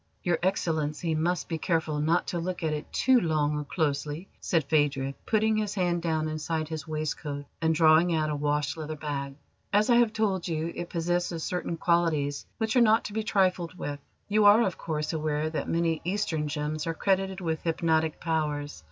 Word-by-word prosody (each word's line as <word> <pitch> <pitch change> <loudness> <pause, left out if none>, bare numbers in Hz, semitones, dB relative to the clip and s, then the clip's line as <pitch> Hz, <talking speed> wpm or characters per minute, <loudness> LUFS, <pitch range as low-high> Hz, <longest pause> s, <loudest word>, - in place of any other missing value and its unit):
"Your 175 -2 +1
Excellency 160 -3 0
must 170 +3 0
be 165 -2 -3
careful 160 -2 0
not 160 +4 +2
to 175 - -2
look 180 +1 -4
at 155 -1 0
it 150 0 -5
too 260 -1 +4
long 150 -3 +1
or 150 - -2
closely," 150 +2 -2
said 165 -4 +1
Phadrig, 140 -2 +1
putting 220 0 +2
his 210 -1 -1
hand 175 -3 +1
down 160 -2 0
inside 155 0 -2
his 155 -2 -5
waistcoat 150 -2 -3 0.2
and 160 0 +2
drawing 160 +2 +5
out 155 -1 0
a - - -1
wash 145 0 0
leather 155 -1 -5
bag. 140 -2 -4 0.4
"As 210 +4 +3
I 235 - +6
have 240 -2 +4
told 200 -5 0
you, 165 0 -2
it 175 - -5
possesses 175 -1 -1
certain 180 -2 -3
qualities 160 -5 +1
which 220 0 -1
are 250 - +6
not 225 0 +5
to 205 - -5
be 220 - 0
trifled 185 -4 +1
with. 145 -4 -4 0.3
You 210 0 +3
are, 210 +3 +7
of 190 -5 -1
course, 155 -1 -3
aware 155 0 -1
that 160 - -3
many 165 -1 0
Eastern 175 -5 -1
gems 150 +1 -3
are 165 - -1
credited 190 +1 0
with 160 -4 -2
hypnotic 160 -1 +1
powers. 150 - -2
160 Hz, 190 wpm, -28 LUFS, 150-180 Hz, 0.4 s, are